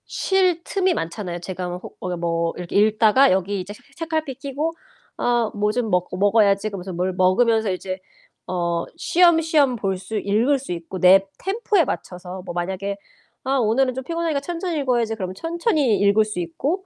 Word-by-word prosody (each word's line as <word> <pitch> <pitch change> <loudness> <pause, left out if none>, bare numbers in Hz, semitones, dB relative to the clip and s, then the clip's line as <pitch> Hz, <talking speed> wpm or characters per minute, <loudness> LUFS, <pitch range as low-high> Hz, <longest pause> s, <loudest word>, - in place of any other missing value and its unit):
쉴 370 -3 +1
틈이 375 0 +1
많잖아요. 175 - -4
제가 180 +1 -5
뭐 175 - -4
호 - - -11
어 180 -1 -4
뭐 170 0 -1
이렇게 180 -1 -6
읽다가 215 +5 +5
여기 190 +2 0
이제 190 +3 -8
채 - - -17
책갈피 315 -4 -3
끼고 280 +4 -3 0.4
'아 240 -2 +1
뭐 210 0 0
좀 235 0 -1
먹고 180 -1 0
먹어야지.' 205 0 +3
그러면서 190 -2 -6
뭘 180 +2 -1
먹으면서 215 +4 +3
이제 185 0 -4 0.5
어 170 -2 -1
쉬엄쉬엄 325 -6 +3
볼 195 -4 -2
수 215 +4 -5
읽을 225 +8 +2
수 260 - -8
있고 170 +2 -7
내 190 +2 +6
템포에 395 -3 +1
맞춰서 180 -4 -6
뭐 175 - -6
만약에 190 +3 -3 0.5
'아 270 +1 +1
오늘은 255 +2 +2
좀 265 - -4
피곤하니까 330 0 -1
천천히 340 +1 -3
읽어야지.' 240 -5 0
그럼 185 -4 -4
천천히 320 - +1
읽을 205 +2 +4
수 210 -4 -5
있고 285 - -2
215 Hz, 355 characters per minute, -22 LUFS, 185-280 Hz, 0.5 s, 내